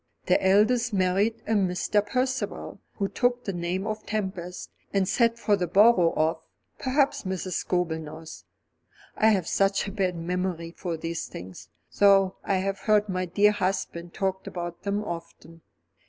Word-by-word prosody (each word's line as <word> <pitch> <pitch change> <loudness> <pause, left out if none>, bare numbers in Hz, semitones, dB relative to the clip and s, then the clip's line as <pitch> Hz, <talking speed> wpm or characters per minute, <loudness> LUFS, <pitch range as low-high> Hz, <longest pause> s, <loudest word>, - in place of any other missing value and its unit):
The - - +2
eldest 215 +5 +3
married 195 +4 +1
a - - -3
Mr. 200 0 +1
Percival, 255 +5 -2 0.2
who 200 - -1
took 245 +3 0
the 195 - -2
name 175 +2 -2
of 215 0 -4
Tempest, 190 -4 -4 0.2
and 195 -2 +1
sat 230 +1 +2
for 210 -3 +2
the 180 -3 -2
borough 190 -2 +5
of 160 +1 +1 0.4
Perhaps 275 +1 +1
Mrs. 190 -1 -4
Scobel 175 -2 -1
knows. 160 +1 -9 0.7
I 220 - +3
have 195 -6 +3
such 195 0 +1
a - - -4
bad 190 -3 -1
memory 170 0 -3
for 170 -1 -4
these 165 +1 -4
things; 90 +1 -10 0.3
though 195 -2 +5
I 195 - 0
have 195 +1 -1
heard 210 -1 +2
my 185 0 -1
dear 205 +4 +4
husband 180 -3 -3
talk 190 -1 -2
about 175 -1 -5
them 200 +1 -1
often." 165 -2 -8
190 Hz, 155 wpm, -26 LUFS, 175-210 Hz, 0.7 s, borough